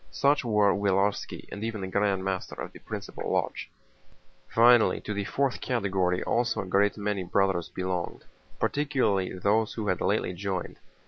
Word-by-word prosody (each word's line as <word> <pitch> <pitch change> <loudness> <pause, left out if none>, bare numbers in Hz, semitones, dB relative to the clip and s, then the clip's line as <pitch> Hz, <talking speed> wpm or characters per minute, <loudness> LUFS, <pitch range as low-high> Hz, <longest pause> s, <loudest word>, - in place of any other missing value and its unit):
Such 140 +1 +2
were 105 -4 +3
Willarski 100 0 0
and 105 - -6
even 110 -2 -3
the - - -2
Grand 100 0 +1
Master 95 -1 -3
of - - -6
the - - -12
principal - - -6
lodge. - - -1 0.8
Finally, 120 0 +5
to 105 - -4
the 100 -1 -2
fourth 135 +2 -1
category 95 -7 0
also 120 0 0
a - - -6
great 100 +3 +2
many 105 -2 -1
Brothers 90 -1 +1
belonged, 90 -2 -4 0.3
particularly 130 -11 0
those 105 +4 +1
who 110 -2 -2
had 90 - 0
lately - - +1
joined. 95 0 -4
100 Hz, 155 wpm, -28 LUFS, 95-110 Hz, 0.8 s, Finally